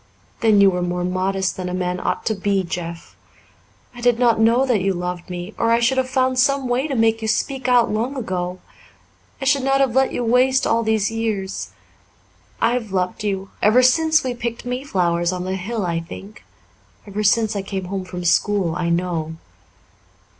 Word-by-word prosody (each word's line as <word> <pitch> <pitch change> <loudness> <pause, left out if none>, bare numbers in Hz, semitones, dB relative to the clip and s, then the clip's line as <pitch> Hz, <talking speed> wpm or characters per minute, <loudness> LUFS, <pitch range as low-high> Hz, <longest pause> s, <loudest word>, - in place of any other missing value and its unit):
"Then 220 -3 +4
you 200 -1 +6
were 180 -1 -2
more 175 0 -2
modest 185 +1 -1
than 180 -1 -4
a 180 - -3
man 180 0 -2
ought - - -2
to 220 - +1
be, 200 -1 0
Jeff. 170 -1 -6 0.8
I 240 - -11
did 245 -1 +3
not 235 -2 +3
know 230 +4 +4
that 240 -7 +1
you 195 0 0
loved 180 0 -5
me, 180 +3 -6
or 230 - +2
I 230 0 +4
should 245 +3 +2
have 255 0 -1
found 260 -1 +1
some 275 0 +2
way 250 +4 0
to 275 - -3
make 225 -1 +2
you 220 - -3
speak 260 +4 -1
out 245 -2 +4
long 235 +6 -2
ago. 180 -6 -3 0.8
I 270 - -4
should 280 0 +3
not 270 +1 +2
have 270 -4 +2
let 265 +1 +3
you 245 - -2
waste 255 +3 +3
all 230 - +2
these 220 -2 +1
years. 215 -4 -3 0.9
I've 235 -3 0
loved 185 +1 -2
you 195 -2 -3
ever 230 +5 +5
since 315 +4 +4
we 255 -1 -2
picked 235 0 -5
mayflowers 185 -10 0
on 180 -1 -4
the 185 +1 -2
hill, 205 +2 -3
I 170 -1 -1
think 195 +5 -10 0.6
ever 205 0 -4
since 215 +1 +2
I 200 - -1
came 190 -1 -5
home 190 +1 -4
from 180 -1 -7
school, 185 0 +2
I 175 -1 -1
know. 170 -2 -1
210 Hz, 195 wpm, -21 LUFS, 180-245 Hz, 0.9 s, you